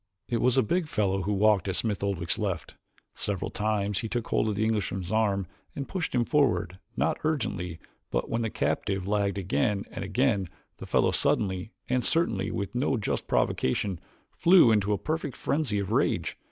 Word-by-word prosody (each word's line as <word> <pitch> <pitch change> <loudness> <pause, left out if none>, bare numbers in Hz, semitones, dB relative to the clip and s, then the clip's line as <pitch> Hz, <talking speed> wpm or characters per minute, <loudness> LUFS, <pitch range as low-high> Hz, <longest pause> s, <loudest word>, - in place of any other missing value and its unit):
It 120 -2 -1
was 125 +1 +3
a 130 - +5
big 170 - 0
fellow 95 -7 0
who 100 +3 -1
walked 105 -1 +3
at 95 - -1
Smith 105 -2 -1
Oldwick's 90 -3 0
left. 95 -6 -3 0.4
Several 100 -3 -3
times 105 -2 0
he 115 - -4
took 120 -1 -3
hold 110 - +2
of 105 - -1
the 105 - 0
Englishman's 95 -4 -1
arm 105 -3 +1 0.3
and 140 - -4
pushed 175 -8 -2
him 120 -1 +2
forward 120 - +1 0.2
not - - +1
ungently, 90 - -1 0.3
but - - -1
when 115 - -1
the 115 - -1
captive 95 -2 -1
lagged 100 -1 +1
again 100 +2 0
and - - -5
again 100 -2 +1 0.3
the - - -9
fellow - - +3
suddenly, 95 +1 0 0.2
and 125 -1 +1
certainly 115 - +1
with 100 -1 -3
no 125 +1 +1
just 105 - -2
provocation, 90 +7 0 0.3
flew 170 -9 +6
into 105 -1 +2
a 105 - +2
perfect 155 -2 -3
frenzy 140 -8 0
of 100 -2 -2
rage. - - +1
105 Hz, 180 wpm, -28 LUFS, 95-120 Hz, 0.4 s, flew